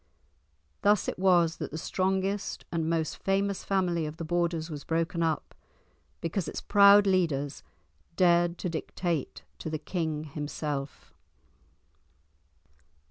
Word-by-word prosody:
Thus 205 0 +3
it - - -3
was 175 -3 +4
that - - -4
the 155 - -6
strongest 190 +4 -1
and 165 -1 -1
most 160 -2 -1
famous 195 0 0
family 175 -5 0
of 150 +1 -7
the 165 - -5
Borders 170 -1 -1
was 145 -2 -6
broken 165 +1 -1
up, 160 -2 -1 0.7
because 165 +2 -2
its - - -4
proud 205 0 +6
leaders 160 -7 0 0.5
dared 175 -1 +3
to - - -3
dictate 165 -2 -3 0.2
to - - -5
the 155 - -2
king 160 -2 -3
himself. 145 -1 -5
170 Hz, 125 wpm, -29 LUFS, 155-190 Hz, 0.7 s, proud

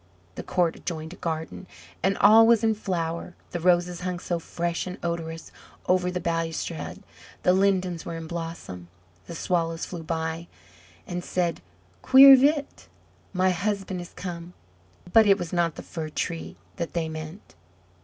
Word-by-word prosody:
The - - -6
court 175 -3 0
adjoined 160 -1 -5
a - - -12
garden, 160 +3 -4 0.3
and 195 +1 +1
all 225 +1 +7
was 230 -2 +4
in 220 -1 +3
flower; 175 -4 -3 0.2
the 175 - -3
roses 175 0 +2
hung 180 0 -2
so 175 0 -3
fresh 170 +2 -3
and 180 - -6
odorous 165 -1 -4 0.4
over 180 0 +2
the 180 0 -2
balustrade, 165 -1 -3 0.4
the 180 - +5
lindens 185 -3 +1
were 170 - -6
in 165 - -7
blossom, 165 - -6 0.4
the 170 - -7
Swallows 165 -1 -1
flew 175 -2 -7
by, 160 +1 -3 0.6
and 175 0 -4
said, 175 - -1 0.4
"Quirre 270 +1 +9
vit! 285 +2 +1 0.4
my 185 0 +2
husband 195 0 -2
is 175 - -11
come!" 175 -1 -7 0.6
but 220 -1 +7
it 200 -1 +6
was 175 -3 -6
not 170 -2 +1
the - - -8
Fir 160 -2 -6
tree 165 +2 -4 0.2
that 170 -2 -4
they 165 -2 -1
meant. 160 +4 -8
175 Hz, 155 wpm, -26 LUFS, 165-185 Hz, 0.6 s, Quirre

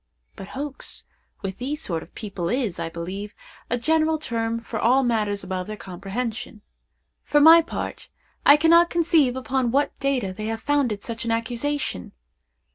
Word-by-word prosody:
But 190 - -9
hoax, 285 -1 -4 0.4
with 195 -1 -4
these 285 +4 -3
sort 170 - -2
of - - -15
people, 195 -5 -4
is, 240 -7 -1
I 165 - -2
believe, 185 +5 -6 0.3
a 245 - +1
general 315 +4 +2
term 230 -5 -2
for 230 -1 -5
all 260 +5 +4
matters 210 -5 0
above 185 -1 -4
their 215 0 -6
comprehension. 210 +4 -5 0.6
For 295 - +3
my 325 +3 +9
part, 325 - -6 0.3
I 285 - +8
cannot 335 +2 +5
conceive 320 -6 +3
upon 260 -1 0
what 280 +4 +1
data 260 -9 0
they 215 +3 -6
have 225 0 -4
founded 270 -8 +1
such 230 -1 -4
an 230 - -3
accusation. 230 - -2
235 Hz, 160 wpm, -24 LUFS, 205-285 Hz, 0.6 s, my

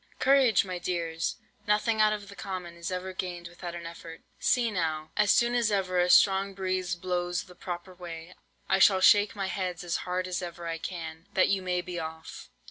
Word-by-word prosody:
Courage, 260 -6 +4
my 185 -2 -4
dears! 170 -2 -2 0.3
nothing 215 +1 +2
out 215 0 +5
of 205 -1 -4
the 200 - -11
common 180 -4 -6
is 170 0 -5
ever 185 +1 -4
gained 175 -2 -5
without 175 0 -8
an 170 -1 -7
effort. 165 -1 -9 0.2
See 240 -3 +2
now! 160 -4 -2
as 210 -1 +3
soon 235 +4 +4
as 240 -2 +2
ever 185 -3 0
a 180 0 +3
strong 195 +1 +5
breeze 185 -2 -1
blows 175 0 -2
the 180 - -15
proper 175 +1 -7
way, 175 -1 -9 0.3
I 190 - +2
shall 190 -1 +6
shake 205 +2 +6
my 195 -1 -2
heads 185 -3 -3
as 175 -2 -1
hard 180 0 -2
as 180 0 -2
ever 175 -1 -7
I 165 0 -3
can, 165 -1 -6
that 185 - +4
you 195 -1 +1
may 180 -1 -1
be 175 0 -5
off. 160 - -8
180 Hz, 205 wpm, -28 LUFS, 170-195 Hz, 0.3 s, shall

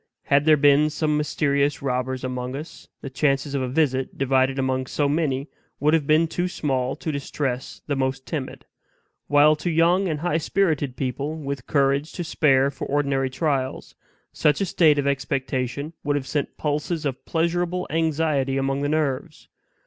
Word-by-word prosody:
Had 140 +1 +2
there 155 -1 +6
been 145 +1 +5
some 150 0 0
mysterious 145 -1 0
robbers 130 -1 -2
among 125 0 -4
us, 150 +3 -9
the 135 - -6
chances 135 +1 0
of 140 - 0
a 130 - -1
visit, 130 -1 0
divided 135 0 +2
among 130 -1 -1
so 145 +2 0
many, 140 -2 0 0.3
would 150 +2 +2
have 155 -3 +2
been 155 +2 +4
too 175 +2 -2
small 135 -7 -1
to 160 - -4
distress 140 -2 -4
the 145 - -1
most 130 0 -2
timid; 145 -6 -5 0.6
while 145 +1 +5
to 175 - -3
young 170 +4 +3
and 155 -3 -2
high 170 -1 +1
spirited 155 -6 0
people, 140 +3 -3
with 140 -5 -5
courage 140 +1 +1
to 175 - -4
spare 140 -4 +3
for 135 - -6
ordinary 140 -2 0
trials, 135 -2 -2 0.4
such 150 -2 +2
a 200 - +1
state 160 -4 +4
of 145 - 0
expectation 135 +1 -2
would 145 0 0
have 140 -2 -2
sent 145 +1 -3
pulses 150 +2 -2
of 135 -3 -3
pleasurable 175 +2 0
anxiety 155 -4 +1
among 135 +1 0
the 145 - 0
nerves. 155 0 -2
145 Hz, 170 wpm, -24 LUFS, 135-155 Hz, 0.6 s, there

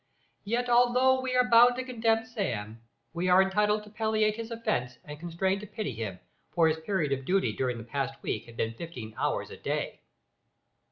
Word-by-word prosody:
Yet 240 +4 0
although 250 +2 +4
we 255 -1 -2
are 250 0 +4
bound 240 +1 +7
to 255 - -3
condemn 225 -3 +1
Sam, 115 - -4 0.3
we 175 +2 -1
are 180 +1 +6
entitled 210 +2 +2
to 210 - -14
palliate 215 -1 +1
his 230 0 -6
offence 215 - -2
and 150 0 -9
constrained 190 +4 -1
to 210 - -8
pity 210 - -4
him, 110 -4 -5 0.4
for 165 -2 +5
his 160 0 +1
period 160 -4 -1
of 135 -1 -1
duty 180 - +1
during 125 +1 -1
the 115 - -7
past 135 +3 -3
week - - -3
had 115 0 -13
been 115 0 -1
fifteen 120 -6 -8
hours - - -1
a - - -9
day. - - -3
195 Hz, 190 wpm, -29 LUFS, 135-230 Hz, 0.4 s, bound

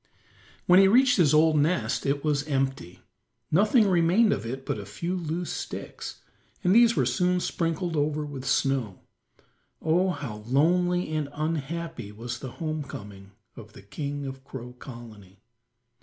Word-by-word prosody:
When 180 +1 +7
he 195 - +7
reached 250 +4 +5
his 165 -7 +4
old 155 0 +4
nest 145 -7 0
it 140 +1 0
was 145 -1 0
empty. 135 - -2 0.5
Nothing 210 - +4
remained 185 +5 +4
of 115 - -4
it 130 +3 -6
but - - -2
a - - -6
few 175 +2 -3
loose 170 0 -3
sticks, - - -7 0.4
and 180 - +4
these 230 +1 +6
were 130 - +2
soon 180 +9 +1
sprinkled 165 0 -2
over 150 0 0
with 140 -3 -7
snow. 130 -6 0 0.8
Oh, 175 +4 +2
how 135 -11 -4
lonely 175 +5 +2
and 150 -2 -1
unhappy 160 -4 -4
was 120 +3 -6
the 130 -2 -7
home 155 -2 -3
coming 100 -8 -10 0.2
of 110 -2 -12
the - - -13
king 145 +7 -5
of 135 0 -7
Crow 125 -2 -9
Colony. 110 -7 -12
150 Hz, 155 wpm, -26 LUFS, 130-175 Hz, 0.8 s, When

